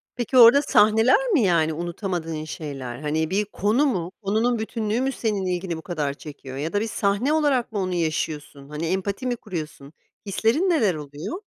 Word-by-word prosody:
Peki 245 +1 -1
orada 245 +3 +9
sahneler 225 - +4
mi, 310 - +4
yani, 165 -4 +2
unutamadığın 170 -1 -4
şeyler? 135 -6 -6
Hani 155 +2 -1
bir 200 +3 0
konu 210 +7 +1
mu, 185 - -1
konunun 220 +4 +1
bütünlüğü 220 +1 -2
mü 265 +1 0
senin 215 -6 -2
ilgini 180 -2 -2
bu - - -8
kadar 155 -5 -2
çekiyor 140 -3 -10
ya 155 +4 -3
da 205 - +1
bir 225 - -1
sahne 205 +7 0
olarak 285 -7 +1
mı 210 - -2
onu 185 -1 -1
yaşıyorsun? 155 -4 -3
Hani 150 +2 -4
empati 195 +8 -2
mi 245 - 0
kuruyorsun 155 -9 -7 0.3
hislerin 225 - +1
neler 225 - +2
oluyor? 150 - -7
190 Hz, 175 wpm, -24 LUFS, 155-230 Hz, 0.3 s, orada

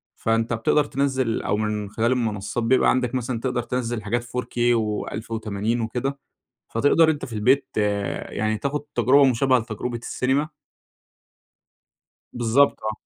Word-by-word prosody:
فأنت 115 +1 0
بتقدر 115 +6 +2
تنزّل 135 -4 0
أو 105 - 0
من 105 -1 -2
خلال 115 +3 0
المنصات 115 -2 -1
بيبقى 125 +3 +4
عندك 130 0 +1
مثلًا 125 -1 -2
تقدر 125 0 -1
تنزّل 120 -2 -3
حاجات 120 +3 -1
4K 125 +1 -6 0.2
و1080 110 0 -2
وكده، 130 +5 -3 0.5
فتقدر 145 +7 +4
أنت 150 -2 -1
في 120 - -10
البيت 125 +6 +2 0.6
يعني 110 +1 -1
تاخد 140 +5 -2
تجربة 140 +2 +5
مشابهة 130 0 +3
لتجربة 115 +1 -4
السينما. 130 +5 -1 1.8
بالضبط، 120 +4 +3
آه. 110 - -1
120 Hz, 130 wpm, -23 LUFS, 110-130 Hz, 1.8 s, تجربة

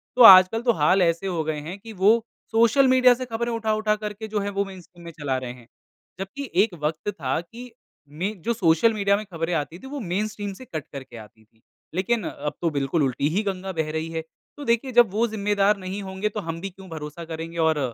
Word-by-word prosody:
तो 250 - +3
आजकल 190 +1 +9
तो - - +7
हाल 185 +3 +3
ऐसे 170 +2 +1
हो 170 -4 -1
गए 155 -1 -2
हैं 165 +6 -7
कि 225 +2 -10
वो, 215 +4 +3 0.3
सोशल 235 +4 +4
मीडिया 255 -1 +6
से 255 +1 -5
ख़बरें 235 0 -3
उठा-उठा 215 -1 0
करके 210 0 -6
जो 215 -1 -2
है 200 0 -2
वो 200 - +2
मेनस्ट्रीम 180 -2 -13
में 170 - -7
चला 145 -4 -2
रहे 130 -1 -5
हैं, 125 -2 -16 0.5
जबकि 235 +8 -6
एक 215 -3 -3
वक़्त 155 +6 -1
था 135 -7 -2
कि 235 +8 -11 0.4
में 185 +6 -4
जो 235 - 0
सोशल 190 +1 +3
मीडिया 200 -1 +2
में 215 - -6
ख़बरें 165 +1 -2
आई 150 -3 +1
थी 225 - -14
वो 285 +1 -5
मेनस्ट्रीम 205 0 -3
से 255 +7 -12
कट 155 - -6
करके 135 -4 -9
आती 110 0 -14
थी। 110 +1 -34 0.3
लेकिन 210 +4 0
अब 150 +1 -5
तो 170 - +2
बिल्कुल 140 +3 +1
उल्टी 135 +2 0
ही 210 - +1
गंगा 190 -1 -3
बह 160 -3 -2
रही 160 +1 -3
है। 165 0 -2 0.4
तो 290 - -7
देखिए 235 +2 +1
जब 235 -5 +5
वो 225 +4 +1
ज़िम्मेदार 205 -1 +1
नहीं 190 +1 -5
होंगे 190 +2 -3
तो 210 - -5
हम 165 +1 -4
भी 195 - -4
क्यों 190 0 -14
भरोसा 155 +1 -7
करेंगे 165 +1 -6
और 160 -2 +2
190 Hz, 230 wpm, -24 LUFS, 160-220 Hz, 0.5 s, आजकल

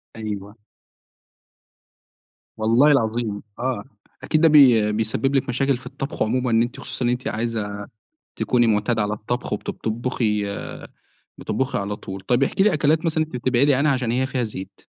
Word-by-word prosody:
أيوه. 105 -1 -6 2.0
والله 115 +7 +4
العظيم، 110 -5 0 0.2
آه 130 0 -2 0.4
أكيد 155 - +1
ده 165 - +6
بي 125 -8 +6
بيسبب 110 +6 0
لِك 135 -1 +1
مشاكل 135 +1 +1
في 125 - -16
الطبخ 135 +3 -3
عمومًا، 125 +2 0
إن 115 0 +4
أنتِ 120 +1 -3
خصوصًا 125 - -3
إن - - +2
أنتِ 125 +1 -2
عايزة 110 -2 -3 0.6
تكوني 120 -1 +2
معتادة 110 +1 +1
على 105 0 -1
الطبخ، 120 +3 -4
وبت 105 - -3
بتطبخي 110 -2 -1 0.9
بتطبخي 130 -4 -2
على 100 +1 -3
طول، 95 -1 -8
طيّب 120 +7 +1
احكِ 140 - -3
لي 205 +1 +5
أكلات 155 +1 +2
مثلًا 160 -1 +1
أنت 155 -5 -8
بتبعدي 130 +3 +3
عنها 140 +2 +2
عشان 125 -3 -1
هي 130 +2 +1
فيها 130 -2 -2
زيت، 95 -4 -7
120 Hz, 160 wpm, -22 LUFS, 110-135 Hz, 2.0 s, ده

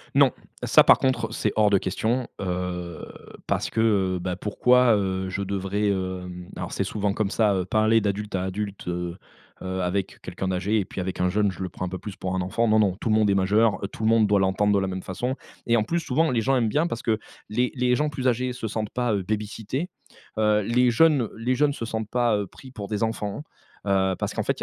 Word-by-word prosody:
Non! - - +6 0.3
Ça - - +6
par - - +7
contre, 120 -4 0
c'est - - 0
hors 105 -1 +5
de 100 - +4
question! 110 +7 -1
Heu, 90 -2 -4 0.4
parce - - 0
que, 110 - 0 0.3
heu, - - -3
bah, 90 0 -3
pourquoi, 125 +3 +4
heu, 95 -1 -1
je 95 - -3
devrais, 100 +1 -1
heu 95 -2 -2 0.2
Alors, - - -5
c'est - - -1
souvent 105 -2 -1
comme 105 -1 -1
ça! 100 -5 +2
Parler 110 +1 +4
d'adulte 105 0 -2
à 95 -1 0
adulte, 100 0 -4
heu, 90 0 -3 0.4
avec, 95 +1 -2
heu, - - -25
quelqu'un 90 +1 -4
d'âgé 95 +4 +1
et 95 - -1
puis 95 - -5
avec 95 +1 -4
un 90 - +2
jeune, 105 0 +1
je 95 - -10
le 95 - -1
prends - - -7
un - - -4
peu 95 - -4
plus 100 -3 -7
pour 90 0 -4
un 95 - 0
enfant, 95 +6 0
non, 110 0 +4
non! 95 -3 +2
Tout 110 - -4
le 110 - +4
monde 105 -2 +3
est 100 - +3
majeur, 105 +3 +3
tout - - -7
le 110 - +3
monde 115 -1 +5
doit 100 -1 +3
l'entendre 95 +2 +2
de 100 - +3
la 95 - -1
même 95 0 -4
façon. 125 +8 -3 0.3
Et 115 - +4
en 110 - +3
plus, 170 +10 -1
souvent, 160 0 +1
les 120 - +1
gens 135 +4 +2
aiment 115 -4 +2
bien 155 +9 +1
parce 120 - -4
que 110 -1 0 0.3
les 125 +3 0
les 125 -1 +2
gens 150 +1 +1
plus 130 -2 0
âgés 125 +1 -1
se 125 -2 -4
sentent 110 0 -3
pas, 125 -2 0
heu, 100 - 0
baby-sitté, 110 - -3 0.5
heu, 105 -1 +3
les 120 +4 +3
jeunes 145 -2 +4
les 125 +3 0
jeunes 145 +2 +2
se 115 - -6
sentent 110 -1 -4
pas, 120 -3 +2
heu, 100 - -3
pris 130 +7 -14
pour 105 -5 -7
des 105 0 -1
enfants. 110 +3 -3 0.4
Heu, 95 -1 +2
parce - - -3
qu'en - - -1
fait - - -1
il - - -11
105 Hz, 245 wpm, -25 LUFS, 95-115 Hz, 0.5 s, par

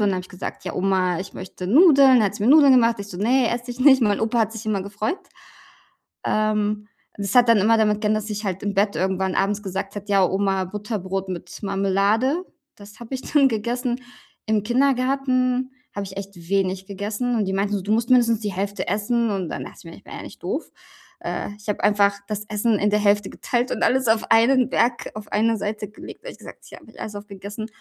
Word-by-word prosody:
dann 205 -1 +3
habe 185 - -1
ich 180 - -13
gesagt: 185 -1 -7
„Ja, - - -4
Oma, 185 -2 +1
ich 190 - -7
möchte 185 -1 -8
Nudeln.“, 270 - +6
hat 205 -1 0
sie 205 - -5
mir 240 - +4
Nudeln 285 -2 +7
gemacht. 235 -2 +4
Ich 200 0 -7
so: 185 - -8
„Ne, 240 +5 +2
esse 240 +1 -4
ich 245 +1 -8
nicht.“ 265 -2 +6
Mein 205 -2 +2
Opa 225 +1 +1
hat 220 0 0
sich 225 0 -8
immer 205 -3 0
gefreut. 210 - -3 1.1
Ähm, 210 -1 0 0.3
das 200 +1 -3
hat 245 -1 +6
dann 230 - +6
immer 225 +3 +4
damit 210 -1 +2
geendet, 215 0 +1
dass 215 - -8
ich 210 0 -4
halt 190 -1 -3
im 205 -1 -1
Bett 200 +1 +1
irgendwann 190 0 -1
abends 205 +2 0
gesagt 195 +1 -5
habe: 205 - -7
„Ja, 195 -2 +4
Oma, 195 0 0
Butterbrot 195 -1 -4
mit 180 -2 -7
Marmelade.“ 200 - +1 0.3
Das 205 +2 -15
habe 235 +3 -8
ich 260 - -6
dann 280 -3 +3
gegessen. 240 +3 -2 0.4
Im 215 -2 +1
Kindergarten 255 +1 +1 0.2
habe 200 -1 -4
ich 190 - -10
echt 200 0 -7
wenig 190 -1 0
gegessen. 210 +5 -3
Und 220 - +1
die 190 - -2
meinten 200 +1 0
so: 195 - -2
„Du 205 - -3
musst 230 +3 +1
mindestens 235 -3 +4
die 210 -3 -4
Hälfte 200 +2 -3
essen.“ 230 +3 0
Und 190 -5 -2
dann - - -5
dachte - - -12
ich - - -15
mir, - - -10
ich - - -20
war - - -11
ja - - -7
nicht - - -12
doof. - - -3 0.5
Äh, - - -3
ich 205 - -9
habe 205 - -2
einfach 205 -1 +3
das 210 -1 -4
Essen 210 0 +1
in 210 - +2
der 210 - +2
Hälfte 205 -1 +2
geteilt 245 +1 -2
und - - -2
alles 260 -1 +2
auf 220 0 +1
einen 250 +2 +4
Berg 240 0 0
auf 215 -1 -8
eine 225 +2 +2
Seite 210 0 -4
gelegt, 210 - -12
habe - - -7
ich - - -16
gesagt: - - -13
„Hier - - -12
habe - - -19
ich - - -18
alles 210 -1 -6
aufgegessen.“ 205 +2 -7
210 Hz, 230 wpm, -22 LUFS, 200-235 Hz, 1.1 s, Nudeln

